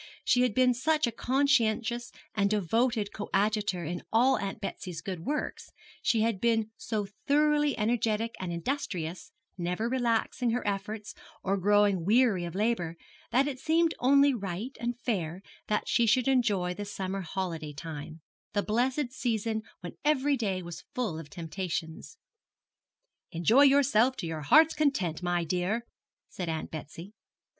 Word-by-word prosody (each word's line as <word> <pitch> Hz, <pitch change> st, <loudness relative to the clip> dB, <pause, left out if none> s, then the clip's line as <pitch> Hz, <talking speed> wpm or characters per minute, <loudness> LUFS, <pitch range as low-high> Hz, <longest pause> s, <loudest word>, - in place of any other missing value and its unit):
She 245 Hz, -, +4 dB
had 250 Hz, -4 st, +1 dB
been 255 Hz, -1 st, +4 dB
such 300 Hz, +5 st, +1 dB
a 235 Hz, -, -1 dB
conscientious 240 Hz, -2 st, +1 dB, 0.2 s
and 200 Hz, -2 st, +2 dB
devoted 215 Hz, +2 st, +1 dB
coadjutor 205 Hz, -2 st, 0 dB
in 175 Hz, +2 st, -4 dB
all 250 Hz, +4 st, +4 dB
Aunt 200 Hz, +1 st, -4 dB
Betsy's 185 Hz, -4 st, -5 dB
good 185 Hz, +1 st, -5 dB
works, 300 Hz, +1 st, -3 dB, 0.3 s
she 225 Hz, -, +2 dB
had 220 Hz, -4 st, 0 dB
been 225 Hz, -2 st, +1 dB
so 215 Hz, -2 st, -3 dB, 0.2 s
thoroughly 295 Hz, 0 st, +3 dB
energetic 225 Hz, 0 st, 0 dB
and 185 Hz, -2 st, -4 dB
industrious, 180 Hz, -, -3 dB, 0.3 s
never 180 Hz, +6 st, -1 dB
relaxing 240 Hz, 0 st, 0 dB
her 240 Hz, +2 st, -1 dB
efforts 205 Hz, +1 st, -3 dB, 0.3 s
or 195 Hz, +1 st, +1 dB
growing 200 Hz, -1 st, +3 dB
weary 210 Hz, -2 st, +3 dB
of 170 Hz, 0 st, -7 dB
labour, 195 Hz, -6 st, 0 dB, 0.3 s
that 270 Hz, +3 st, +3 dB
it 265 Hz, -3 st, -4 dB
seemed 325 Hz, +3 st, +2 dB
only 280 Hz, +2 st, +5 dB
right 200 Hz, +3 st, -4 dB
and 240 Hz, +1 st, -3 dB
fair 185 Hz, -6 st, -2 dB, 0.2 s
that 210 Hz, -, 0 dB
she 235 Hz, -, +3 dB
should 255 Hz, +4 st, +3 dB
enjoy 210 Hz, -9 st, +2 dB
the 205 Hz, -, -5 dB
summer 195 Hz, -1 st, -4 dB
holiday 165 Hz, -4 st, -4 dB
time, 155 Hz, +1 st, -8 dB, 0.3 s
the 205 Hz, -1 st, +1 dB
blessed 250 Hz, +4 st, 0 dB
season 225 Hz, -3 st, -1 dB, 0.2 s
when 175 Hz, -2 st, -8 dB
every 290 Hz, -1 st, +3 dB
day 195 Hz, -7 st, -2 dB
was 175 Hz, 0 st, -8 dB
full 220 Hz, -11 st, -2 dB
of 155 Hz, -3 st, -10 dB
temptations. 165 Hz, -, -5 dB, 1.1 s
'Enjoy 195 Hz, -, +4 dB
yourself 270 Hz, -3 st, +5 dB
to 175 Hz, -, -4 dB
your 160 Hz, -1 st, -4 dB
heart's 310 Hz, -, +6 dB
content, 235 Hz, -, 0 dB
my 175 Hz, -1 st, 0 dB
dear,' 180 Hz, +7 st, -1 dB, 0.4 s
said 180 Hz, -3 st, -5 dB
Aunt 160 Hz, -1 st, -3 dB
Betsy. 165 Hz, +5 st, -8 dB
215 Hz, 150 wpm, -29 LUFS, 180-250 Hz, 1.1 s, heart's